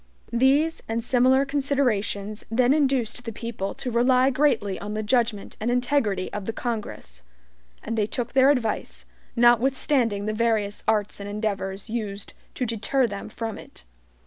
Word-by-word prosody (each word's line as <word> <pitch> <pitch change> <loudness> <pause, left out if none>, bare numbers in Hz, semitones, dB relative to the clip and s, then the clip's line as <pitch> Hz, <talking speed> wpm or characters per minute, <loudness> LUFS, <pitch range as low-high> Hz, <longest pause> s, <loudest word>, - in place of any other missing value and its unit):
These 275 +7 +3
and 230 +1 -1
similar 255 +2 +3
considerations 245 -7 -1
then 245 +3 +3
induced 265 -5 +1
the 230 - -5
people 225 -3 -5
to 250 - -4
rely 255 +3 +4
greatly 245 -9 +1
on 210 +1 -5
the 215 - -2
judgment 225 -2 0
and 220 - -1
integrity 245 -6 0
of 205 -2 -4
the 225 - -3
Congress; 215 - -5 0.6
and 225 - -3
they 210 -2 +1
took 240 +1 -4
their 265 +1 +6
advice, 245 -7 -1 0.3
notwithstanding 240 -2 +3
the 215 - -1
various 215 -2 0
arts 210 -2 0
and 200 0 -6
endeavors 200 -2 -3
used 210 -3 -5 0.2
to 255 - -1
deter 230 +4 +1
them 200 -3 -5
from 225 -1 -5
it. - - -14
230 Hz, 150 wpm, -25 LUFS, 210-255 Hz, 0.6 s, their